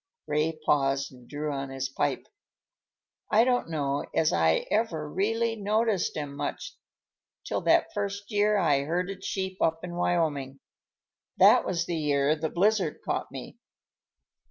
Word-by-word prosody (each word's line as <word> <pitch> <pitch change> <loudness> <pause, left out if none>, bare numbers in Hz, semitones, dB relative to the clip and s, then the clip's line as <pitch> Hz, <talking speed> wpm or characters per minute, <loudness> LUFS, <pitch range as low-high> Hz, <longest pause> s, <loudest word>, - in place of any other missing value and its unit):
Ray 150 +2 0
paused 135 -1 +1
and 125 -1 -16
drew 150 +1 -3
on 135 -1 -4
his 135 0 -3
pipe. 135 0 -2 1.0
"I 220 +2 +5
don't 245 -7 +1
know 145 -3 -1
as 160 - +3
I 80 -1 +2
ever 175 -9 0
really 225 +7 0
noticed 215 -3 0
'em 145 -2 -4
much - - -4 0.7
till - - -2
that - - +3
first 200 0 -4
year 210 0 +3
I 145 -8 +3
herded 180 +4 -2
sheep 190 -1 -3
up 165 0 +1
in 175 -1 -6
Wyoming. 150 -6 -1 0.8
That - - +6
was 170 -2 -1
the 170 -1 -2
year 145 -1 +2
the 160 0 -3
blizzard 190 -2 +1
caught - - -2
me." - - -9
165 Hz, 145 wpm, -27 LUFS, 145-200 Hz, 1.0 s, That